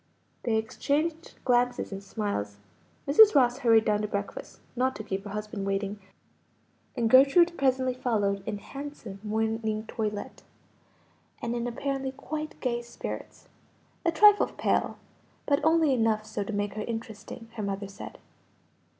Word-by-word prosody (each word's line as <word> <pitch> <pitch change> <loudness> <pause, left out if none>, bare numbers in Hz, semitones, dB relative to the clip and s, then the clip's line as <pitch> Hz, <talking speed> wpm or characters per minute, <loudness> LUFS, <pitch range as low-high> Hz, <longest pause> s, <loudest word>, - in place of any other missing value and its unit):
They 230 -2 0
exchanged 305 +9 -1
glances 245 -2 +2
and 195 0 -6
smiles. 195 - -3 0.5
Mrs. 415 +10 +7
Ross 250 -2 +4
hurried 225 -4 +5
down 210 -1 +2
to 210 - -1
breakfast, 205 - -5 0.2
not 260 +1 +1
to 215 - -6
keep 195 0 -4
her - - -6
husband 210 0 -5
waiting, 195 +1 -2 1.0
and 235 -2 +2
Gertrude 280 +8 +6
presently 260 -2 +1
followed 205 -6 0
in 215 -1 -2
handsome 275 -5 -8
morning 220 0 -1
toilet, 210 -2 -4 1.0
and 235 0 -3
in 240 0 -2
apparently 270 +2 -2
quite 305 +3 -6
gay 240 -2 0
spirits; 235 0 -8 0.6
a 340 - +2
trifle 415 +5 +6
pale, - - 0 0.5
but 285 -1 +2
only 320 -2 +4
enough 225 -3 +1
so 215 -1 -3
to 200 - -5
make 205 -1 -2
her 215 - -4
interesting, 225 0 -6
her 220 - -5
mother 200 0 -3
said. 195 - -10
230 Hz, 140 wpm, -28 LUFS, 210-270 Hz, 1.0 s, Mrs